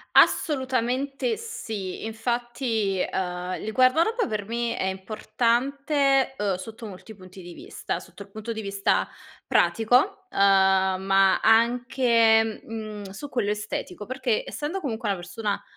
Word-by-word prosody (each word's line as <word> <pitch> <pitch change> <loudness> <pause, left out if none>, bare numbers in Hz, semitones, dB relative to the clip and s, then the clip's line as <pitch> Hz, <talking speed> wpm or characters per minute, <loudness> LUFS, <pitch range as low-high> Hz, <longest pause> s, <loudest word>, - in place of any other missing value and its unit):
Assolutamente 270 - +2
sì. 220 - -6
Infatti, 225 -2 -2
ehm, 180 0 -2
il 220 - -4
guardaroba 320 - +3
per 210 -3 -3
me 235 +2 -2
è - - -1
importante, 265 +8 0
uhm, 200 -3 0
sotto 220 +5 -9
molti 205 +2 -10
punti 185 0 -13
di 175 -1 -10
vista: - - -5
sotto 200 - -12
il 200 - -20
punto 215 +3 -6
di 220 - -4
vista 200 -1 0 0.4
pratico, 255 - +2
uhm, - - -9
ma 190 0 +4
anche, 230 -1 +3
mhmm, 215 -2 -7
su 285 +9 -8
quello 230 -6 0
estetico, 210 -2 -5
perché 255 -3 -1
essendo 330 +6 -4
comunque 230 -5 -3
una 200 -2 0
persona, 205 +3 -4
225 Hz, 130 wpm, -25 LUFS, 195-255 Hz, 0.4 s, ma